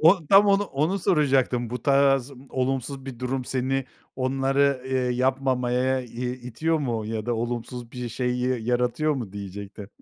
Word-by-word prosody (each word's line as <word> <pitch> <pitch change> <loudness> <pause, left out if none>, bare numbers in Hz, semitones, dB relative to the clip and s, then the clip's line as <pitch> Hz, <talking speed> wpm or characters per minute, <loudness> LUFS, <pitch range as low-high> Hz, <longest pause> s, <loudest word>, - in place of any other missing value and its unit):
O 165 +1 +5
tam 195 +5 +7
onu 200 0 +4
onu 160 +3 0
soracaktım, 135 -8 +2
bu 125 -1 -4
tarz 135 -1 +3 0.2
olumsuz 135 +1 -2
bir 130 -3 -7
durum 130 +1 -2
seni 135 +1 -1 0.3
onları, 135 +1 +1
eee, 130 - 0
yapmamaya 130 0 +1
i 125 +1 -4 0.2
itiyor 160 +7 0
mu 115 -7 -2
ya 110 0 -4
da 120 - +1
olumsuz 120 +1 -4
bir 125 -1 -4
şey 125 +1 -1
y 125 0 0
yaratıyor 125 +6 +1
mu 115 -8 -5
diyecektim. 100 0 -8
130 Hz, 155 wpm, -25 LUFS, 120-135 Hz, 0.3 s, tam